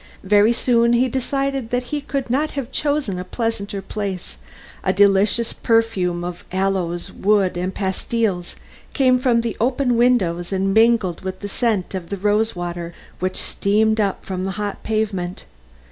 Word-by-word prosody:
Very 205 Hz, +3 st, +5 dB
soon 235 Hz, 0 st, +3 dB
he 245 Hz, +2 st, +3 dB
decided 270 Hz, 0 st, -2 dB
that 245 Hz, +1 st, 0 dB
he 295 Hz, -, 0 dB
could 275 Hz, -1 st, -3 dB
not 295 Hz, +4 st, +1 dB
have 265 Hz, -2 st, -3 dB
chosen 285 Hz, -11 st, -1 dB
a -, -, -3 dB
pleasanter 200 Hz, -1 st, -3 dB
place; 195 Hz, -, -4 dB, 0.5 s
a -, -, +2 dB
delicious 205 Hz, +3 st, +3 dB
perfume 200 Hz, -7 st, +1 dB
of 175 Hz, 0 st, -6 dB
aloes 185 Hz, -2 st, -1 dB
wood 195 Hz, -3 st, +2 dB
and 180 Hz, +2 st, -2 dB
pastilles 190 Hz, -1 st, -2 dB, 0.4 s
came 255 Hz, -2 st, +4 dB
from 245 Hz, -3 st, +3 dB
the 230 Hz, -1 st, -3 dB
open 250 Hz, 0 st, +1 dB
windows 190 Hz, -9 st, +2 dB
and 195 Hz, 0 st, 0 dB
mingled 220 Hz, -5 st, +3 dB
with 190 Hz, 0 st, -5 dB
the 205 Hz, -, -4 dB
scent 205 Hz, -3 st, -1 dB
of 180 Hz, -3 st, -5 dB
the 200 Hz, -, -3 dB
rose 210 Hz, +3 st, +1 dB
water 175 Hz, -1 st, -5 dB, 0.2 s
which 185 Hz, +1 st, -1 dB
steamed 220 Hz, +2 st, +1 dB
up 200 Hz, -2 st, -1 dB
from 185 Hz, -1 st, -3 dB
the 190 Hz, -, -2 dB
hot 205 Hz, -1 st, -3 dB
pavement. 200 Hz, -5 st, -2 dB
205 Hz, 160 wpm, -21 LUFS, 185-235 Hz, 0.5 s, Very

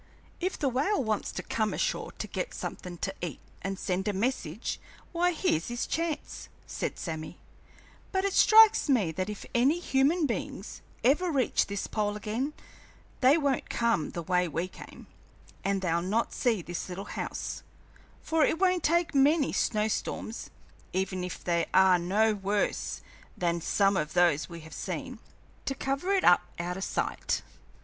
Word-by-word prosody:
"If 370 Hz, +1 st, -1 dB
the 285 Hz, -, 0 dB
whale 275 Hz, -, +1 dB
wants 215 Hz, -2 st, -1 dB
to -, -, -4 dB
come 215 Hz, -2 st, -1 dB
ashore -, -, -1 dB
to -, -, -5 dB
get -, -, -4 dB
somethin' 180 Hz, -1 st, -6 dB
to 195 Hz, -, -4 dB
eat 175 Hz, -4 st, -4 dB, 0.2 s
and 195 Hz, 0 st, -3 dB
send 190 Hz, +1 st, -2 dB
a 210 Hz, -, +1 dB
message, 205 Hz, -3 st, -2 dB, 0.3 s
why, 355 Hz, +1 st, +2 dB
here's 310 Hz, -, 0 dB
his 240 Hz, 0 st, -2 dB
chance!" 330 Hz, -2 st, -3 dB, 0.2 s
said -, -, -4 dB
Sammy; 160 Hz, 0 st, -5 dB, 0.7 s
"but 380 Hz, 0 st, +1 dB
it 395 Hz, -, 0 dB
strikes 440 Hz, -6 st, +7 dB
me 215 Hz, -12 st, +3 dB
that 185 Hz, +5 st, -3 dB
if 210 Hz, -, -6 dB
any 265 Hz, +7 st, +4 dB
human 305 Hz, +1 st, +2 dB
beings 220 Hz, -4 st, -4 dB, 0.2 s
ever 305 Hz, +9 st, +3 dB
reach 275 Hz, -6 st, +2 dB
this 200 Hz, 0 st, -3 dB
pole 210 Hz, -1 st, -1 dB
again, 225 Hz, +8 st, -2 dB, 0.7 s
they 270 Hz, +4 st, +6 dB
won't 280 Hz, -4 st, 0 dB
come 230 Hz, -10 st, +1 dB
the 170 Hz, -, -5 dB
way 180 Hz, +1 st, +2 dB
we 165 Hz, +2 st, -2 dB
came, -, -, -12 dB, 0.6 s
and 195 Hz, -1 st, 0 dB
they'll 170 Hz, -1 st, +1 dB
not 210 Hz, +6 st, 0 dB
see 225 Hz, -8 st, +1 dB
this 175 Hz, +2 st, -5 dB
little 190 Hz, +3 st, -5 dB
house, -, -, -4 dB, 0.6 s
for 320 Hz, -1 st, +2 dB
it 320 Hz, -, +2 dB
won't 365 Hz, -1 st, +3 dB
take 335 Hz, +1 st, +2 dB
many 285 Hz, +2 st, +4 dB
snow 215 Hz, -1 st, +1 dB
storms 220 Hz, +1 st, -3 dB, 0.4 s
even 185 Hz, -1 st, -1 dB
if 180 Hz, -, -6 dB
they 170 Hz, -1 st, +1 dB
are 190 Hz, -1 st, +6 dB
no 210 Hz, +5 st, +2 dB
worse 200 Hz, 0 st, -1 dB, 0.4 s
than 170 Hz, -1 st, 0 dB
some 195 Hz, +4 st, +2 dB
of 150 Hz, -3 st, -1 dB
those 175 Hz, -4 st, +3 dB
we 170 Hz, -1 st, -8 dB
have 160 Hz, +1 st, -12 dB
seen -, -, -5 dB, 0.5 s
to 270 Hz, -, -1 dB
cover 275 Hz, +8 st, -1 dB
it 390 Hz, -1 st, +3 dB
up 175 Hz, -, +7 dB, 0.2 s
out 175 Hz, +1 st, -3 dB
o' -, -, -5 dB
sight." 195 Hz, -, -1 dB
210 Hz, 165 wpm, -29 LUFS, 180-280 Hz, 0.7 s, strikes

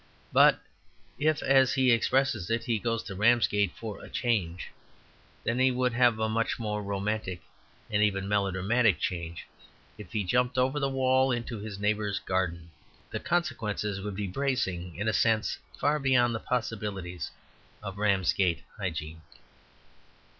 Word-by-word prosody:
But -, -, +6 dB, 0.6 s
if, 155 Hz, +1 st, +1 dB
as 135 Hz, -1 st, +4 dB
he 130 Hz, -1 st, +4 dB
expresses 125 Hz, -4 st, +2 dB
it, 115 Hz, 0 st, 0 dB
he 115 Hz, -3 st, 0 dB
goes 115 Hz, 0 st, -1 dB
to -, -, -7 dB
Ramsgate 105 Hz, -2 st, +3 dB
"for 110 Hz, -3 st, -7 dB
a -, -, -10 dB
change," 95 Hz, -8 st, -1 dB, 0.7 s
then 115 Hz, +2 st, 0 dB
he 130 Hz, 0 st, +5 dB
would 125 Hz, -1 st, 0 dB
have 120 Hz, -2 st, +4 dB
a 110 Hz, 0 st, 0 dB
much 115 Hz, +1 st, 0 dB
more 105 Hz, -2 st, -3 dB
romantic 100 Hz, -2 st, -2 dB, 0.5 s
and 105 Hz, 0 st, 0 dB
even 100 Hz, -2 st, +1 dB
melodramatic 100 Hz, +1 st, +2 dB
change 85 Hz, -2 st, -4 dB, 0.5 s
if 95 Hz, -4 st, -10 dB
he 105 Hz, -, -1 dB
jumped 125 Hz, +7 st, +1 dB
over 130 Hz, +3 st, +2 dB
the 140 Hz, -1 st, 0 dB
wall 130 Hz, 0 st, +2 dB
into 120 Hz, -2 st, -3 dB
his 105 Hz, -1 st, -6 dB
neighbours 105 Hz, 0 st, 0 dB
garden. 85 Hz, -3 st, -2 dB, 0.4 s
The -, -, -3 dB
consequences 105 Hz, -, -1 dB
would 100 Hz, 0 st, -5 dB
be 105 Hz, +1 st, -2 dB
bracing 95 Hz, -6 st, -2 dB
in 105 Hz, -, -3 dB
a 110 Hz, -, +2 dB
sense 110 Hz, -1 st, +1 dB, 0.2 s
far 150 Hz, +1 st, +2 dB
beyond 125 Hz, -3 st, +3 dB
the 115 Hz, -, -2 dB
possibilities 105 Hz, -8 st, -3 dB, 0.5 s
of 100 Hz, -1 st, -6 dB
Ramsgate 95 Hz, -3 st, +2 dB
hygiene. 80 Hz, -5 st, -4 dB
105 Hz, 145 wpm, -28 LUFS, 95-125 Hz, 0.7 s, But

